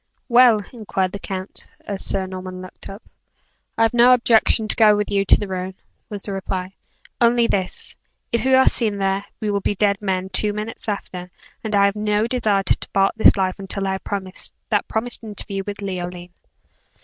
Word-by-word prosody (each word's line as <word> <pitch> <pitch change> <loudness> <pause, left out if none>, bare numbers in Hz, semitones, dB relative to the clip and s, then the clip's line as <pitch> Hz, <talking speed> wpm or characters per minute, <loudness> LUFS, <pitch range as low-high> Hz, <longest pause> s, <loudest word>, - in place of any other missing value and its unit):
"Well," 240 -4 +5
inquired 195 -5 -2
the 200 - -6
count, 190 0 -6 0.2
as 200 -2 -4
Sir 195 -1 -1
Norman 185 0 -7
looked 185 0 -10
up. 195 +3 -10 0.7
"I - - +4
have 225 - +2
no 245 +1 +7
objection 225 -2 +3
to - - +2
go 215 -2 +6
with 210 0 -2
you 200 -1 +1
to - - +5
the 205 - -4
ruin," 185 0 -4 0.3
was 205 -3 -6
the 200 - -4
reply, 190 -1 -4 0.5
"only 235 0 +4
this; 190 -5 -2 0.4
if 235 - 0
we 265 0 +4
are 265 - +5
seen 215 -4 +1
there, 195 0 0 0.2
we 210 -1 -1
will 200 0 0
be 205 - -1
dead 200 0 +1
men 190 -2 -2
two 205 +2 +1
minutes 215 +1 -5
after; 180 -3 -5 0.3
and 215 -2 -1
I 200 0 +5
have 200 0 +1
no 210 0 +1
desire 220 -5 +1
to - - +3
depart 195 0 0
this 220 - +5
life 185 -1 -1
until 195 0 -3
I - - 0
have 190 - -3
had 190 -2 -4 0.3
that - - +1
promised 235 +2 -3
interview 205 -2 -5
with 205 0 -5
Leoline." 180 -2 -5
200 Hz, 195 wpm, -21 LUFS, 190-220 Hz, 0.7 s, no